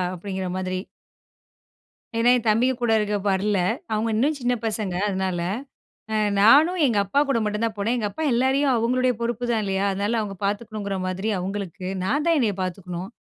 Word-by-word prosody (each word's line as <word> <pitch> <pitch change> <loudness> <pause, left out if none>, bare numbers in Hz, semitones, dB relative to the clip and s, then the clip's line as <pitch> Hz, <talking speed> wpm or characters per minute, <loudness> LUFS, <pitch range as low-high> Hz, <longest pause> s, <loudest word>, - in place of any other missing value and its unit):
அப்டிங்கிற 190 0 -4
மாதிரி. 185 0 -2 1.4
ஏன்னா, 235 +2 +4
என் 235 - -6
தம்பிய 240 +5 +3
கூட 235 -2 +2
இருக்க 210 0 -1 0.2
வரல. 195 +1 +1 0.3
அவுங்க 220 +2 0
இன்னும் 285 +6 +1
சின்ன 245 0 +1
பசங்க 210 -4 -2
அதனால. 190 -2 -1 0.7
அ - - +1 0.2
நானும் 300 - +6
எங்க 230 -5 +1
அப்பாகூட 275 +5 +1
மட்டுந்தான் 210 +1 -1
போனேன். 225 +5 0
எங்க 210 -3 -1
அப்பா 315 +10 -5
எல்லாரையும் 265 +2 +2
அவுங்களுடைய 250 +2 +2
பொறுப்புதான் 235 -1 -1
இல்லயா! 195 0 -1
அதனால 205 +4 0
அவுங்க 200 -2 -5
பார்த்துக்கணுங்கிற 205 -1 -3
மாதிரி 190 +4 -2
அவுங்களுக்கு. 185 -1 -5 0.2
நான் 290 - 0
தான் 330 -2 +4
என்னைய 215 -6 +1
பார்த்துக்கணும். 180 0 -5
215 Hz, 155 wpm, -24 LUFS, 195-245 Hz, 1.4 s, நானும்